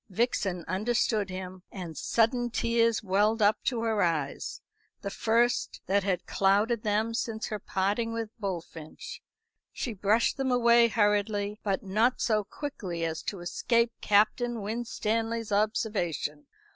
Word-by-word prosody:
Vixen 190 -4 -1
understood 210 +1 0
him, 185 0 -7
and 175 -5 -7
sudden 235 - +1
tears 230 -1 +1
welled 210 +3 +2
up 210 0 +3
to 235 -3 0
her 220 -2 +1
eyes 155 -5 -1 0.4
the 200 - -4
first 235 +4 +1
that 200 +1 +2
had 185 -2 -1
clouded 205 +4 +2
them 215 +2 0
since 225 -1 -3
her 215 - -3
parting 205 +5 -1
with 230 -1 -4
Bullfinch. 190 - -6 0.5
She 240 - -4
brushed 210 +6 +2
them 270 -1 0
away 235 -1 +5
hurriedly, 205 -1 +1
but 195 -2 -1
not 220 +6 +2
so 215 -2 +1
quickly 190 - -5
as 160 -1 -3
to 195 -4 -5
escape 235 +6 +1
Captain 220 +2 +2
Winstanley's 225 0 -2
observation. 200 -8 -1
215 Hz, 135 wpm, -28 LUFS, 195-230 Hz, 0.5 s, away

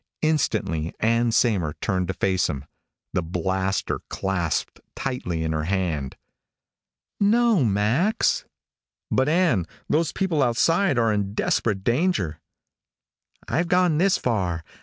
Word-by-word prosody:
Instantly, 105 - 0
Ann 115 +1 +2
Saymer 100 -10 +1
turned 90 -4 -1
to 95 - -3
face 95 -1 +1
him, 70 -2 -4 0.5
the - - +1
blaster 95 +3 -1
clasped 90 -4 -2 0.2
tightly 90 -12 -3
in 80 - -1
her 80 -1 -1
hand. 85 -7 -2 1.0
"No, 220 - +4
Max." 115 - +1 0.7
"But, 130 +2 +2
Ann, 160 - +2 0.2
those 160 +1 +1
people 180 -6 0
outside 140 +7 +2
are 115 -2 +3
in 100 -1 -2
desperate 100 -4 0
danger 120 - 0 0.5
" - - -69 0.3
"I've 170 +2 0
gone 180 -3 +3
this 190 +1 +3
far. 90 -9 -1
110 Hz, 120 wpm, -24 LUFS, -, 1.0 s, No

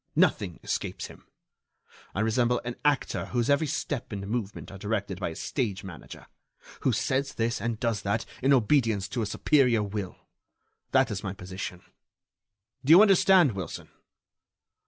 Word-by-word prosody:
Nothing - - +2
escapes - - -3
him. - - -13 0.9
I 100 - 0
resemble 120 +2 +2
an 120 0 -4
actor 145 -2 +1
whose 120 +2 0
every 150 +2 +3
step 140 -2 -3
and 100 -2 -4
movement 105 -2 -4
are 100 - -10
directed 100 -3 -2
by 95 - -2
a 80 - -8
stage 105 - -2
manager; 95 -4 -10 0.5
who - - +1
says 135 +1 -1
this 115 +1 -1
and 115 -2 -2
does 115 -4 0
that 100 +3 -1 0.2
in 135 +2 +3
obedience 115 -5 +3
to 125 - -2
a 110 - -1
superior 125 -3 +3
will. 100 -2 -4 0.8
That 130 -3 +3
is 105 0 -4
my 95 -2 -3
position. 90 -1 -7 1.0
Do 135 - -4
you 170 +5 +10
understand, 190 - +5
Wilson?" 95 -5 -6
115 Hz, 155 wpm, -27 LUFS, 100-130 Hz, 1.0 s, you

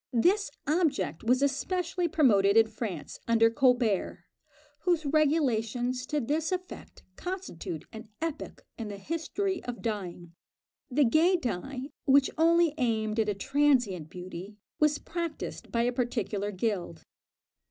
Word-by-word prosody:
This 360 - +3 0.2
object 295 - 0
was 250 +4 +3
especially 345 +5 0
promoted 215 -10 +4
in 225 - +7
France, 215 -7 -6
under 225 -1 +4
Colbert, 245 -5 +1 0.5
whose 330 -1 +1
regulations 255 -5 +1
to 300 +1 0
this 300 +7 -1
effect 365 0 -6
constitute 355 - -5
an 220 0 -9
epoch 325 -1 -5
in 225 - -4
the 205 -1 -6
history 330 - -2
of 245 -1 -6
dyeing. 180 -6 -4 0.6
The 280 +2 +3
gay 320 +10 +4
dye 265 - -4
which 275 -1 +5
only 335 -1 +4
aimed 220 -3 0
at 215 -1 +2
a 205 - 0
transient 245 - +1
beauty, 185 +3 -8 0.2
was 300 -1 +3
practised 335 -2 -5
by 235 0 +1
a 245 - +2
particular 225 -5 -1
guild. 185 -5 -3
250 Hz, 130 wpm, -29 LUFS, 215-310 Hz, 0.6 s, in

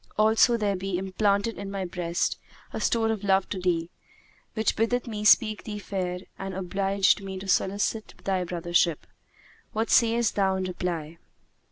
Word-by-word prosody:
Also, 220 +3 +4
there 205 -3 0
be 190 -1 -2
implanted 200 +3 0
in 200 -1 -5
my 195 -1 -3
breast 175 -1 -2 0.3
a - - -4
store 225 -1 +2
of 215 -2 -3
love 195 -1 +2
to 190 - -3
thee, 175 -2 -1 0.6
which 220 -1 +1
biddeth 240 +2 0
me 215 -3 -5
speak 215 0 +4
thee 210 -2 -5
fair 185 -3 -3 0.2
and 195 -1 -5
obligeth 195 +2 +1
me 190 -1 -6
to 190 +1 -8
solicit 205 +3 0
thy 190 -2 0
brothership. 175 -2 0 0.7
What 220 +1 -1
sayest 230 -2 +3
thou 195 -2 +2
in 190 - -2
reply?" 170 -3 -4
195 Hz, 160 wpm, -26 LUFS, 180-215 Hz, 0.7 s, Also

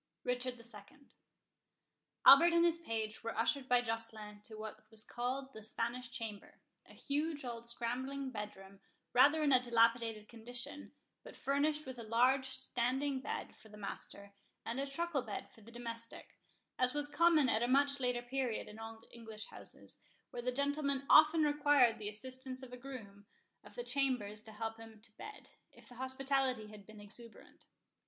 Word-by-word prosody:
RICHARD 250 0 -1
II 230 +2 -8 1.3
Albert 335 +5 +10
and 340 0 +5
his 335 -1 +2
page 220 -8 -3
were 230 - -4
ushered 260 +4 +1
by 245 0 +4
Joceline 220 -2 -4
to 220 - -6
what 215 0 -8
was 220 -1 -2
called 265 +3 -3
the 220 - -9
Spanish 235 +3 -1
Chamber, 225 -4 -7 0.3
a - - -15
huge 295 0 -2
old 235 -1 -5
scrambling 260 +3 -2
bedroom, 195 -3 -8 0.3
rather 290 +5 +6
in 290 - +3
a 255 - +7
dilapidated 230 -2 +2
condition, 240 +5 -5 0.3
but - - -12
furnished 295 +2 +1
with 260 -2 -7
a - - -6
large 250 +4 +3
standing 260 +1 0
bed 275 - -5
for 220 - -18
the 210 - -12
master, 200 0 -7 0.3
and 235 +3 -3
a 275 - -1
truckle 305 +1 -1
bed 220 -5 -6
for 225 - -19
the 220 - -14
domestic, 230 -1 -8 0.4
as 255 +2 +2
was 295 0 +2
common 325 -2 +4
at 225 -2 +2
a 240 - +2
much 280 +2 +4
later 245 -1 0
period 250 -2 -2
in 210 +1 -11
old 225 0 -9
English 220 -2 -9
houses, - - -6 0.3
where 240 - -5
the 250 +1 -1
gentleman 280 0 +1
often 310 +1 +8
required 290 -5 +4
the 210 -1 -4
assistance 255 +4 -5
of 250 -1 -10
a - - -6
groom 220 -6 -10 0.4
of - - -15
the 485 - -4
chambers 250 - 0
to 220 - -12
help 225 +1 -5
him 225 -1 -12
to 225 +1 -16
bed, 425 - -9 0.2
if - - -17
the - - -11
hospitality 260 -3 0
had 210 -2 -13
been 215 -1 -12
exuberant. 220 +3 -9
245 Hz, 170 wpm, -36 LUFS, 225-275 Hz, 1.3 s, Albert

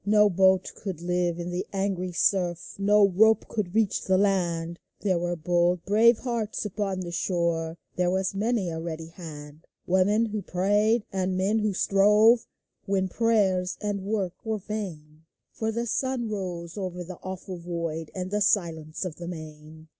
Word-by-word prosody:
No 210 +1 +4
boat 190 +1 +3
could 190 -6 -5
live 175 -1 0
in 175 0 -4
the 180 +1 -2
angry 190 -2 -1
surf, 175 -1 0
No 205 0 +5
rope 220 +4 +4
could 210 -4 -3
reach 220 -3 +2
the 190 0 +3
land: 170 -4 0 0.2
There 185 -4 +1
were 175 0 -1
bold, 175 +1 +1
brave 220 +4 +5
hearts 230 -4 -3
upon 195 -2 -2
the 175 -1 -5
shore, 170 -2 -1 0.2
There 180 -1 +2
was 190 +1 0
many 205 -2 0
a 160 - -4
ready 165 -1 -5
hand 155 -3 -10
— - - -62
Women 200 +5 +3
who 215 -1 -3
prayed, 205 +5 +2
and 185 -1 0
men 200 +4 +2
who 210 -2 0
strove 210 +5 +4 0.4
When 190 -1 +1
prayers 195 -5 +1
and 205 -2 -2
work 195 -3 -1
were 220 -1 -1
vain; 165 -7 -7 0.3
For 220 0 -2
the 235 +2 -2
sun 255 0 -1
rose 180 -2 -5
over 180 -2 -4
the 180 0 -9
awful 185 -1 -6
void 170 -2 -4
And 185 0 -4
the 210 0 0
silence 165 -5 0
of 165 -4 -5
the 175 - -7
main. 155 -1 -9
185 Hz, 170 wpm, -26 LUFS, 170-210 Hz, 0.4 s, No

